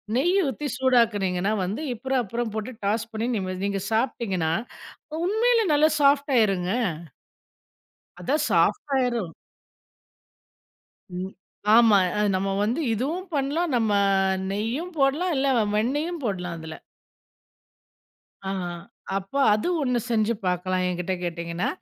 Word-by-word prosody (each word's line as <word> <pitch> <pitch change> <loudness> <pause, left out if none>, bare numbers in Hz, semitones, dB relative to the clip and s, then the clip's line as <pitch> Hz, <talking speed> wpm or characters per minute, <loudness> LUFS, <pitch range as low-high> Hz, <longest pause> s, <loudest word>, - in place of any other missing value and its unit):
நெய் 350 +9 +2
ஊத்தி 280 +3 -3
சூடாக்கினீங்கன்னா, 210 -7 +2
வந்து 200 +11 -3
அப்புறம் 265 +2 -1
அப்புறம் 230 +2 -3
போட்டு 220 +4 -3
டாஸ் 220 +2 0
பண்ணி 225 +2 -2
நீம 185 -2 -3
நீங்க 200 -1 -1
சாப்ட்டீங்கன்னா, 210 -8 0 0.7
உண்மையிலே 455 +3 +3
நல்லா 305 +2 +5
சாஃப்ட் 280 0 +3
ஆகிருங்க. 195 -4 +2 1.5
அதான் 285 - 0
சாஃப்ட்டாயிரும். 250 - +1 1.9
ம். 190 +1 -5 0.4
ஆமா, 225 -3 +7 0.2
அ - - +1
நம்ம 195 +1 0
வந்து 235 +9 0
இதுவும் 320 - -2
பண்ணலாம். 290 +3 0
நம்ம 225 -2 +1 0.6
நெய்யும் 235 - -3
போடலாம். 300 +6 +2
இல்ல, 275 +1 +1 0.3
வெண்ணெயும் 295 +8 -1
போடலாம், 180 -5 -3
அதுல. 160 -1 -8 1.7
ஆ - - -1 0.2
ஆ 175 - -5 0.4
அப்ப, 195 +4 -12 0.2
அது 215 - -1
ஒண்ணு 250 -2 +1
செஞ்சு 225 0 +2
பார்க்கலாம் 185 0 0
என்கிட்ட 180 +1 -2
கேட்டீங்கன்னா. 170 0 -3
230 Hz, 115 wpm, -25 LUFS, 190-275 Hz, 1.9 s, ஆமா